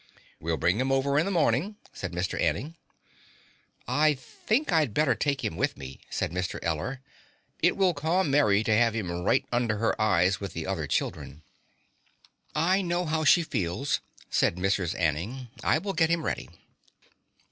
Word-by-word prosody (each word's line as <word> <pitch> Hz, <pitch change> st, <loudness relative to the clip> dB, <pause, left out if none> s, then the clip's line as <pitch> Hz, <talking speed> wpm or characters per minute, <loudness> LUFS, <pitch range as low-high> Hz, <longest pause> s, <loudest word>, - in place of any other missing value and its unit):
"We'll 80 Hz, 0 st, -1 dB
bring 90 Hz, +6 st, +1 dB
him 130 Hz, +1 st, 0 dB
over 140 Hz, +1 st, +2 dB
in 155 Hz, -, +2 dB
the -, -, -1 dB
morning," 170 Hz, -, +1 dB, 0.2 s
said 95 Hz, -, -5 dB
Mr. 90 Hz, +1 st, -2 dB
Anning. 155 Hz, +4 st, 0 dB, 1.1 s
"I 150 Hz, +4 st, +3 dB
think 220 Hz, -, -2 dB
I'd 155 Hz, -10 st, +2 dB
better 150 Hz, -4 st, +3 dB
take 140 Hz, +2 st, -1 dB
him -, -, -2 dB
with -, -, -1 dB
me," 65 Hz, -1 st, -9 dB
said -, -, -2 dB
Mr. 90 Hz, +1 st, -2 dB
Eller. 85 Hz, -, -2 dB, 0.6 s
"It 175 Hz, +4 st, +3 dB
will 190 Hz, -2 st, +3 dB
calm 160 Hz, +2 st, 0 dB
Mary 110 Hz, -8 st, +4 dB
to 110 Hz, -1 st, +2 dB
have 115 Hz, 0 st, +3 dB
him 100 Hz, -6 st, -2 dB
right 90 Hz, +2 st, +1 dB
under 120 Hz, -3 st, +1 dB
her 110 Hz, 0 st, 0 dB
eyes 95 Hz, -2 st, +3 dB
with 100 Hz, -1 st, -6 dB
the 80 Hz, -1 st, -4 dB
other 90 Hz, -6 st, -2 dB
children." 75 Hz, +3 st, -3 dB, 1.1 s
"I 180 Hz, +6 st, +3 dB
know 175 Hz, -1 st, -1 dB
how 160 Hz, 0 st, 0 dB
she 170 Hz, +3 st, +5 dB
feels," 120 Hz, -, -1 dB, 0.3 s
said -, -, +2 dB
Mrs. 90 Hz, -2 st, -1 dB
Anning. 95 Hz, -, -1 dB
"I -, -, +3 dB
will 195 Hz, +4 st, -3 dB
get 160 Hz, -3 st, +2 dB
him 170 Hz, -1 st, 0 dB
ready." -, -, -3 dB
125 Hz, 170 wpm, -27 LUFS, -, 1.1 s, she